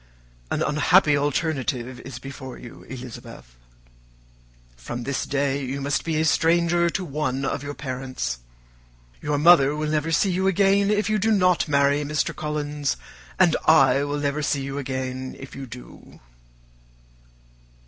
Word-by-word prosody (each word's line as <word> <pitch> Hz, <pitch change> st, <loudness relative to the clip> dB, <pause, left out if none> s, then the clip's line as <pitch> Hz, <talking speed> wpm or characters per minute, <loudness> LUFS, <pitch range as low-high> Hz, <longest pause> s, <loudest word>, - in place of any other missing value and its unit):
"An -, -, 0 dB
unhappy 150 Hz, +1 st, +4 dB
alternative 140 Hz, -4 st, -1 dB
is 125 Hz, -1 st, -8 dB
before 135 Hz, -1 st, -9 dB
you, 120 Hz, -, -11 dB
Elizabeth. 120 Hz, -, -10 dB, 1.2 s
From 120 Hz, -, -6 dB
this 135 Hz, +2 st, -2 dB
day 140 Hz, 0 st, 0 dB
you 135 Hz, +2 st, -3 dB
must 140 Hz, +1 st, -1 dB
be 160 Hz, -2 st, -1 dB
a 160 Hz, -, +2 dB
stranger 170 Hz, +2 st, +3 dB
to 185 Hz, +2 st, -3 dB
one 135 Hz, -3 st, -2 dB
of 135 Hz, -, -2 dB
your 145 Hz, 0 st, -6 dB
parents. 130 Hz, -, -4 dB, 0.8 s
Your 150 Hz, -1 st, -1 dB
mother 150 Hz, -2 st, +6 dB
will 155 Hz, 0 st, -2 dB
never 155 Hz, +1 st, 0 dB
see 190 Hz, +4 st, +2 dB
you 190 Hz, +2 st, 0 dB
again 195 Hz, +1 st, +3 dB
if 210 Hz, 0 st, +1 dB
you 215 Hz, -1 st, +1 dB
do 220 Hz, +3 st, +2 dB
not 180 Hz, -7 st, +3 dB
marry 140 Hz, 0 st, +2 dB
Mr. 150 Hz, 0 st, -1 dB
Collins, 150 Hz, -1 st, -2 dB, 0.4 s
and 175 Hz, -4 st, +4 dB
I 140 Hz, -3 st, +5 dB
will 145 Hz, 0 st, -2 dB
never 145 Hz, +1 st, -1 dB
see 140 Hz, -2 st, 0 dB
you 140 Hz, +1 st, -4 dB
again 130 Hz, -1 st, -4 dB
if 135 Hz, -, -10 dB
you 135 Hz, -1 st, -7 dB
do." 125 Hz, +1 st, -13 dB
145 Hz, 150 wpm, -24 LUFS, 135-160 Hz, 1.2 s, mother